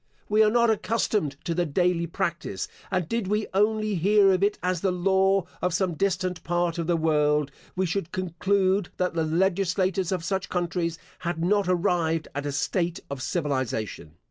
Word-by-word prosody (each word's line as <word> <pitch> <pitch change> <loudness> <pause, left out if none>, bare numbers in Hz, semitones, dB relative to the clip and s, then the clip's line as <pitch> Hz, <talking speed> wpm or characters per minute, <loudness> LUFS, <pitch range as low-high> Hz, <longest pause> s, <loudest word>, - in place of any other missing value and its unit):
Were 215 +1 +5
we - - +5
not 235 0 +4
accustomed 210 -8 0
to 170 - 0
the 175 +1 +1
daily 170 +2 +1
practice, 170 - -3 0.2
and 185 -4 -1
did 230 -1 -1
we 210 +2 0
only 215 +1 +2
hear 195 +2 +4
of 185 - 0
it 205 +1 +2
as 180 -2 0
the 195 - +2
law 190 +1 +2 0.2
of 180 -1 0
some 185 -2 0
distant 185 +1 -1
part 175 0 0
of 165 - -2
the 175 -1 +2
world, 150 -2 +2 0.2
we 190 +1 +1
should 175 0 -2
conclude 185 +1 0
that 180 -1 0
the 165 -1 0
legislators 185 +2 +1
of 180 -3 -1
such 190 +1 -2
countries 175 -1 -1 0.2
had 175 -2 -3
not 200 0 +2
arrived 170 -3 +1
at 145 +1 -3
a - - -1
state 170 +5 -1
of 140 -1 -4
civilisation. 130 - -2
180 Hz, 175 wpm, -26 LUFS, 165-195 Hz, 0.2 s, Were